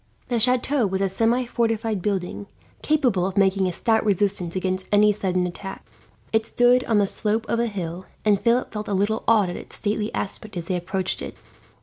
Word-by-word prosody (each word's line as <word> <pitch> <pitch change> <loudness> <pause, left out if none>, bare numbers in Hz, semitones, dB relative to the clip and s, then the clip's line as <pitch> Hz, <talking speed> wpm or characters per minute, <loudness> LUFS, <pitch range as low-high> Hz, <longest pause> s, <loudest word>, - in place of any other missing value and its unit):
The 240 -2 +1
chateau 250 +1 +2
was 190 0 -2
a 195 - +2
semi 230 +6 +1
fortified 225 -3 -1
building, 180 - -3 0.3
capable 255 -12 +2
of 190 - -6
making 190 -1 +3
a - - -1
stout 220 +5 +1
resistance 195 -4 0
against 185 0 -2
any 210 0 +5
sudden 185 -3 -1
attack. 195 +2 -7 0.5
It 220 0 +2
stood 245 +1 +4
on 225 - +2
the 205 - +4
slope 215 +3 -1
of 230 - 0
a 235 - +1
hill, 185 -3 -5 0.2
and 205 -2 +3
Philip 240 +2 +2
felt 210 0 -4
a 200 - -1
little 205 +3 0
awed 210 -5 +4
at - - -6
its - - -10
stately 210 +1 -1
aspect 200 0 -4
as 170 - -4
they 185 - +1
approached 185 +1 -2
it. - - -6
205 Hz, 200 wpm, -23 LUFS, 190-225 Hz, 0.5 s, any